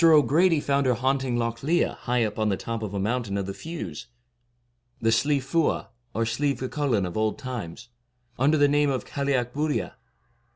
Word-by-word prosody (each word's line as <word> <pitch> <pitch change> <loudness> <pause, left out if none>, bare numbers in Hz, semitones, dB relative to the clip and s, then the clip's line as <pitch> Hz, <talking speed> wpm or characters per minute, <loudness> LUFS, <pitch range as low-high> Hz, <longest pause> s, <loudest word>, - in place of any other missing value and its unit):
O' 155 -3 +7
Grady 165 +3 +3
found 140 -1 +1
her 125 - +3
haunting 130 0 0
Lough 115 0 +1
Liath 170 +5 +2
high 125 -1 0
up 105 0 -3
on 110 -1 +2
the 95 - 0
top 115 -1 -4
of 105 -3 -4
a - - -1
mountain 110 0 -1
of 100 - -2
the 100 - -4
Fews, 155 - -7 0.9
the 115 -1 +2
Slieve 140 +4 +2
Fuadh, 155 +4 0 0.3
or 115 +1 +1
Slieve 135 +3 0
G 130 - -2
Cullain 130 -10 0
of 90 - -6
old 110 +2 0
times, 120 -6 -6 0.5
under 145 +4 +4
the 145 -1 +5
name 145 0 +3
of 130 -2 -1
the - - -17
Cailleac 135 -4 0
Buillia. 145 - -1
130 Hz, 200 wpm, -26 LUFS, 115-145 Hz, 0.9 s, O